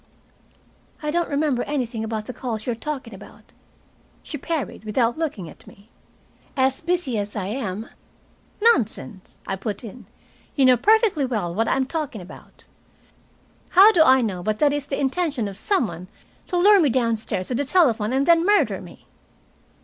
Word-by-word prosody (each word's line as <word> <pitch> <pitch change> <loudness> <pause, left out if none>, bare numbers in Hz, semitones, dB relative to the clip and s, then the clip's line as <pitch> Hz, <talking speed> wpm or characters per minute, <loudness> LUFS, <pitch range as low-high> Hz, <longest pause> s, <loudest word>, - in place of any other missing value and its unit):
"I 300 - -1
don't 345 +1 0
remember 285 -3 0
anything 245 -6 -3
about 220 -1 -4
the 255 - -6
calls 225 -4 -5
you 245 - -1
are - - -3
talking 260 -2 -6
about," 195 - -13 0.8
she - - -7
parried, 300 -4 -4
without 230 +2 0
looking 290 - -4
at - - -15
me. 215 -2 -17 0.7
"As 265 0 +1
busy 330 -9 -1
as 205 0 -5
I 200 -3 -3
am 215 -1 -4 0.4
" - - -35
"Nonsense," 215 -4 -5
I 195 - -2
put 205 +1 -5
in, 230 +2 -10 0.5
"you 275 - +4
know 255 -1 +6
perfectly 415 - +3
well 210 -9 -2
what 225 +4 0
I - - +2
am 265 - +1
talking 290 -5 -4
about. 180 - -13 1.0
How 390 +4 +8
do 350 - +3
I 265 -4 +6
know 190 -5 -3
but 215 +3 -1
that 290 +2 +3
it - - 0
is 290 0 -7
the 275 - -3
intention 280 - -1
of 200 - -7
some 325 - +1
one 175 -1 -8 0.4
to 360 - -1
lure 400 +3 +6
me 300 - +3
downstairs 230 -6 -1
to - - -2
the 265 +4 0
telephone 255 - +2
and 270 +2 +1
then 335 0 +5
murder 410 +3 +2
me?" - - -14
255 Hz, 180 wpm, -23 LUFS, 215-300 Hz, 1.0 s, How